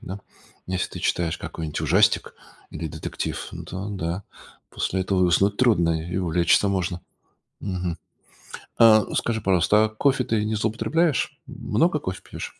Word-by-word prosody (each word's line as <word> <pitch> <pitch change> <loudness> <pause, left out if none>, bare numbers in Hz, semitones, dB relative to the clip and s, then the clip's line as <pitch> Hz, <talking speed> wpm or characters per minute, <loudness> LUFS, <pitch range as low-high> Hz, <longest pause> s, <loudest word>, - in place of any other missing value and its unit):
да? 95 +3 -7 0.5
Если 90 0 -2
ты - - -6
читаешь 85 -2 -1
какой-нибудь 80 -2 -5
ужастик 90 +7 +3 0.4
или 80 - -5
детектив, - - -5
ну, - - -7
то 95 +3 -6
да, 90 0 -3 0.5
после 95 0 -1
этого 95 0 0
и - - +5
уснуть 100 +4 +2
трудно, 85 -9 +2
и - - -3
увлечься 90 +2 +2
можно. 90 -2 -1 0.6
Мгм. 90 -3 -3 0.8
А, 110 -2 +7
скажи, 115 -1 0
пожалуйста, 100 +2 +3
а - - -3
кофе 130 +4 +1
ты 110 -2 0
не 110 0 -1
злоупотребляешь? 125 +7 0
Много 150 +8 0
кофе 95 -5 -5
пьешь? - - -9
95 Hz, 150 wpm, -24 LUFS, 85-110 Hz, 0.8 s, А